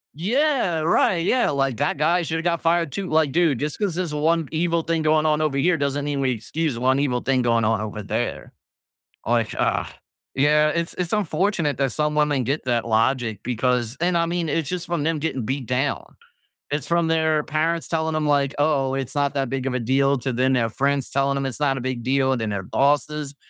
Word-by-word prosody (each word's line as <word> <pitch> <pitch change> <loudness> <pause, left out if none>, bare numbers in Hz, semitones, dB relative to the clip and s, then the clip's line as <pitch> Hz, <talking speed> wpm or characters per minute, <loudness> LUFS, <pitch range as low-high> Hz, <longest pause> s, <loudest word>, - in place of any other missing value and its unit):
Yeah, 225 - +1
right, 165 +2 +2
yeah, 250 +5 +2
like, 135 -4 0
that 145 +1 0
guy 165 +4 +2
shoulda 165 0 -3
got 170 -1 0
fired 165 -2 +1
too 190 +6 -4
like, 155 -2 +2
dude, 165 -3 +2
just 150 +1 -3
'cause 200 -6 -1
there's 175 -4 -2
one 160 +1 +1
evil 165 +1 0
thing 165 0 -1
going 155 0 +2
on 155 0 +2
over 150 -3 0
here 165 +6 +3
doesn't 140 -1 -1
mean 145 -1 -2
we 135 -1 +1
excuse 130 +4 -3
one 130 +3 +2
evil 125 -4 0
thing 130 -1 +1
going 115 -2 +2
on 110 -1 +1
over 105 0 -5
there. 110 +4 -3 0.7
Like, 115 -2 0
ugh, - - 0 0.5
yeah, 150 +2 +4
it's 170 +1 -2
it's 180 0 -3
unfortunate 175 - 0
that 135 -4 0
some 150 0 0
women 150 -3 +2
get 140 +5 -2
that 120 -2 0
logic 115 -1 +1
because 125 -1 0
and, 175 0 +2
I 170 - +2
mean, 170 -1 -2
it's 155 0 -1
just 180 +1 -3
from 170 -4 -2
them 160 0 0
getting 135 -6 -3
beat 130 +2 -3
down. 130 +3 -2 0.6
It's 145 -2 -2
from 170 -1 +1
their 160 -1 +2
parents 160 +2 -1
telling 160 -1 -1
'em, 155 -1 0
like, 140 -1 +2
"Oh, 140 -3 +1
it's 135 -1 -4
not 145 -1 0
that 135 -2 -1
big 135 0 -3
of 130 - -1
a - - 0
deal," 135 +4 +2
to 130 +1 -3
then 130 +2 +2
their 115 -3 +1
friends 140 +3 -1
telling 140 0 +1
them 135 0 -2
it's 135 0 -4
not 140 -2 +1
a - - -4
big 130 -1 -3
deal, 130 +1 +2
then 110 -3 -2
their 100 -2 -3
bosses. 145 +4 0
145 Hz, 215 wpm, -23 LUFS, 130-160 Hz, 0.7 s, yeah